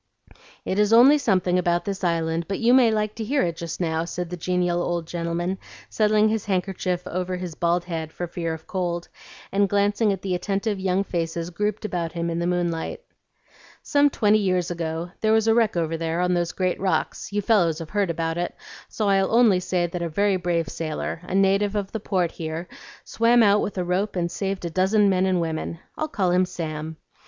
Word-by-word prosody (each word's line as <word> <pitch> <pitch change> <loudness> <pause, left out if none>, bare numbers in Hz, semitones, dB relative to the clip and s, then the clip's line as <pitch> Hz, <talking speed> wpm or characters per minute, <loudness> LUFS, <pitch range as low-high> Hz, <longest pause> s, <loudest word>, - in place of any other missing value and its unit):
"It 190 - -1
is 210 0 +3
only 265 +6 +7
something 185 -7 +2
about 175 +1 0
this 200 -1 -4
island, 165 -1 0
but 195 - -2
you 235 +1 +3
may 255 -3 +6
like 215 -1 0
to 225 - -3
hear 275 +6 +1
it 170 -2 -1
just 165 -1 -6
now," 160 -2 0
said 175 +1 -5
the - - -2
genial 180 0 0
old 175 -1 -2
gentleman, 175 +2 -3 0.3
settling 215 0 +3
his 220 -1 -1
handkerchief 185 -2 -1
over 185 +1 -3
his 180 -2 -5
bald 170 +2 +1
head 160 -3 -4
for 175 - -4
fear 170 -1 -4
of 160 0 -14
cold, 175 -2 -3 0.4
and 200 0 +2
glancing 205 +2 +2
at 195 -2 -4
the 190 -2 -1
attentive 195 +3 -1
young 190 +1 +1
faces 170 -2 -3
grouped 210 +4 -2
about 170 -5 -3
him 170 0 -2
in 165 - -2
the 170 - -1
moonlight. 175 - -2 0.8
"Some 290 0 +3
twenty 215 -5 +3
years 185 -3 0
ago 170 0 -4
there 220 0 +3
was 220 0 +3
a 225 - +5
wreck 225 -5 +2
over 165 -1 0
there 165 +1 -2
on 180 0 +2
those 175 -1 0
great 185 -1 -1
rocks; 190 +1 -1
you 205 0 -1
fellows 175 -8 +3
have 165 -2 -8
heard 205 -3 +1
about 165 0 -2
it, 175 - -3 0.3
so 215 - -2
I'll 195 -1 +2
only 225 -5 +5
say 180 -1 0
that 175 +1 -4
a 170 - -2
very 200 +4 +2
brave 175 -3 -1
sailor, 155 +2 -4
a 185 - -4
native 195 +1 +2
of 200 -2 -2
the 220 - -3
Port 185 -4 0
here, 160 +2 -5 0.4
swam 235 +1 +3
out 205 0 +4
with 200 - -4
a 180 - 0
rope 185 +4 -1
and 170 -1 -1
saved 195 -2 -3
a 170 - -3
dozen 195 +4 +3
men 185 0 +2
and 185 -1 +2
women. 165 0 -3 0.2
I'll 310 - -2
call 190 -11 0
him 180 +1 +3
Sam. 160 -3 -5
180 Hz, 210 wpm, -24 LUFS, 170-205 Hz, 0.8 s, only